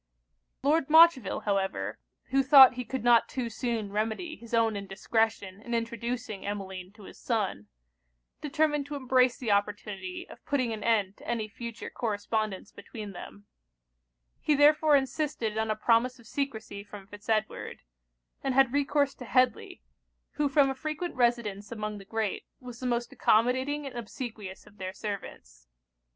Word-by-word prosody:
Lord 300 +1 +2
Montreville 320 - +6
however, 190 - -1 0.3
who 270 +1 +4
thought 265 -1 +9
he 250 0 -4
could 260 0 -4
not 240 -1 +5
too 245 -3 -3
soon 225 -3 -3
remedy 220 - -2
his 235 -1 -14
own 225 -2 +2
indiscretion 200 0 -1
in 235 +1 -3
introducing 235 -2 -3
Emmeline 190 -2 -5
to 210 -1 -15
his - - -12
son, 200 - -2 0.7
determined 295 -1 0
to 290 - -5
embrace 255 -2 +2
the 230 -5 -2
opportunity 200 -2 -2
of - - -14
putting 255 -5 0
an 215 -1 -6
end 205 -4 +1
to - - -14
any 230 -2 -1
future 230 +1 -7
correspondence 215 -2 -2
between 210 -3 -9
them: 200 +2 -10 0.9
he 300 - +2
therefore 300 +1 +5
insisted 265 -5 -1
on 220 0 -1
a 215 - +1
promise 235 +4 +2
of 235 - -18
secresy 220 -6 -4
from 205 -1 -11
Fitz 205 +2 -13
Edward; 215 -1 -2 0.6
and 270 -2 0
had 270 -2 +4
recourse 285 0 +2
to 250 - -10
Headly, 255 +2 +1 0.5
who 295 -1 0
from 275 -1 +4
a - - -2
frequent 310 +5 -4
residence 235 -5 0
among 215 -2 -4
the 195 - -12
great 220 0 -3
was 245 -2 -10
the 255 - -3
most 240 0 -1
accommodating 260 +6 +2
and 270 - -7
obsequious 220 -4 -7
of 205 - -19
their 185 0 -4
servants. 190 - -7
230 Hz, 155 wpm, -29 LUFS, 205-265 Hz, 0.9 s, thought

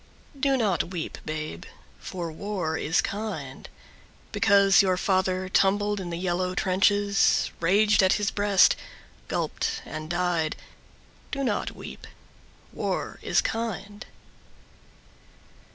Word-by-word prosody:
Do 270 0 +2
not 205 -8 +1
weep, 175 -2 -5
babe, 155 - -5 0.4
for 170 -3 -5
war 175 -2 -3
is 160 +1 +1
kind. 195 -11 -5 0.6
Because 200 0 +5
your 185 -2 +1
father 185 0 0
tumbled 205 +2 +2
in 180 -2 -5
the 170 - -4
yellow 180 +1 -1
trenches, 200 +2 +2
Raged 205 +6 +4
at 190 0 +4
his 205 -1 0
breast, 205 -2 +4 0.5
gulped - - -2
and 155 0 -7
died, 175 -3 0 0.7
Do 275 -1 -3
not 215 -6 -1
weep. - - -10 0.7
War - - -3
is - - +2
kind. 210 -3 -4
190 Hz, 110 wpm, -26 LUFS, 175-205 Hz, 0.7 s, Because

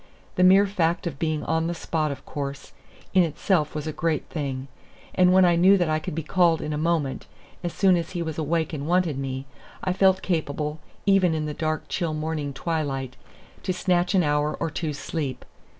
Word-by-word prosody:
The 180 - +2
mere 190 +2 +7
fact 175 -4 0
of 140 -5 -4
being 155 -2 -1
on 160 0 0
the 170 - -2
spot, 155 -2 -1
of 140 0 -8
course, 140 -1 -5 0.4
in 190 - +6
itself 160 -1 0
was 150 -1 -3
a 155 - -3
great 165 -3 -1
thing; 135 -4 -4 0.5
and 180 -1 +4
when 185 0 +6
I 175 -1 +4
knew 185 +4 +6
that 175 -4 +1
I 155 - +1
could 155 - -5
be 165 - -2
called 170 0 +3
in 150 - -3
a - - -1
moment, 155 -3 -1 0.4
as 175 - -2
soon 190 0 +4
as 170 -1 -2
he 175 -2 -2
was 160 -1 -4
awake 160 +1 0
and 145 -1 -4
wanted 175 -5 +1
me, 135 0 -4 0.4
I 185 - +1
felt 190 0 +3
capable, 150 -3 -2 0.3
even 195 -4 +4
in 155 -1 -2
the 150 - -3
dark, 155 0 -2
chill 165 -4 -2
morning 155 -2 -3
twilight, 135 -3 -3 0.5
to 185 - -1
snatch 180 0 +1
an 185 - +4
hour 150 0 +1
or 160 - -2
two's 150 -1 -3
sleep. 145 -6 -4
160 Hz, 205 wpm, -25 LUFS, 150-175 Hz, 0.5 s, mere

